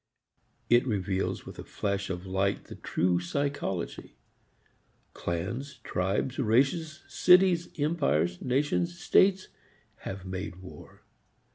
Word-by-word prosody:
It 120 +2 +4
reveals 95 -3 -1
with - - -10
a - - -5
flash 100 -1 -3
of 90 -1 -4
light 95 +1 0
the - - -10
true 90 0 0
psychology. 95 - -3 1.0
Clans, 115 +12 -4
tribes, 100 +9 -1
races, 140 +7 +1
cities, 180 -2 +5
empires, 140 - +1
nations, 150 +7 0
states 190 0 +3 0.5
have 95 -1 -7
made 95 0 -5
war. 90 0 -13
110 Hz, 105 wpm, -29 LUFS, 95-145 Hz, 1.0 s, cities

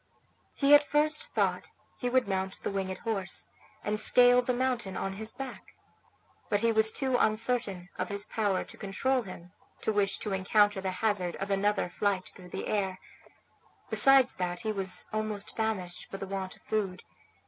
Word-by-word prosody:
He 280 0 +4
at 290 - +9
first 305 +10 0
thought - - 0 0.3
he 245 - -1
would 255 -2 +2
mount 190 -1 -3
the - - -2
winged 190 -1 -3
horse, 200 -5 -2 0.3
and 210 0 -1
scale 245 +2 +6
the 250 - -1
mountain 245 -6 -1
on 195 - -3
his 220 +3 -5
back; 270 -2 -9 0.7
but 205 - +1
he 230 0 +3
was 220 0 +4
too 260 -1 0
uncertain 215 -4 0
of - - -2
his 200 0 -3
power 205 -3 -1
to - - -13
control 250 +6 0
him 180 -4 -11 0.3
to 220 - 0
wish 200 -1 +1
to 210 - -4
encounter 205 +1 +2
the 190 - -2
hazard 185 -2 -1
of 195 +1 -5
another 200 0 +1
flight 190 +1 -1
through 180 -2 -14
the - - -5
air, 195 -3 -1 0.9
besides 270 -2 +7
that 180 +1 -3
he 220 -2 -2
was 195 -3 -1
almost 215 -2 -4
famished 200 -6 -3
for 195 - -6
the 195 - -5
want 190 -1 -5
of - - -25
food. 200 -4 -2
205 Hz, 175 wpm, -29 LUFS, 190-235 Hz, 0.9 s, at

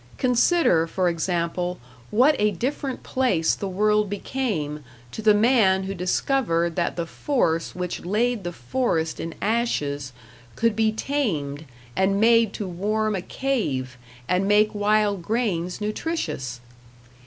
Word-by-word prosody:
Consider, 250 - +3
for 180 +1 +1
example, 175 +1 -1 0.3
what 260 +8 +4
a 210 0 +4
different 260 - -3
place 240 -12 +1
the 200 - -4
world 210 +2 +2
became 195 - -3 0.3
to - - -6
the 215 -1 +5
man 210 -4 +4
who 195 +1 -4
discovered 175 -2 0
that 175 - -1
the 170 -1 -2
force 165 - -1
which 180 -1 -4
laid 220 +4 0
the 175 - -3
forest 160 - -1
in 165 - -5
ashes 145 - -1 0.4
could 230 -1 +1
be 220 0 +2
tamed 170 - -2 0.3
and 195 +1 +2
made 230 -1 +5
to 205 - -4
warm 210 +4 -1
a 185 - -2
cave 155 - -2 0.3
and 185 +2 +1
make 210 +1 +4
wild 205 -1 +2
grains 180 -4 -1
nutritious! 175 - -3
200 Hz, 130 wpm, -24 LUFS, 170-230 Hz, 0.4 s, the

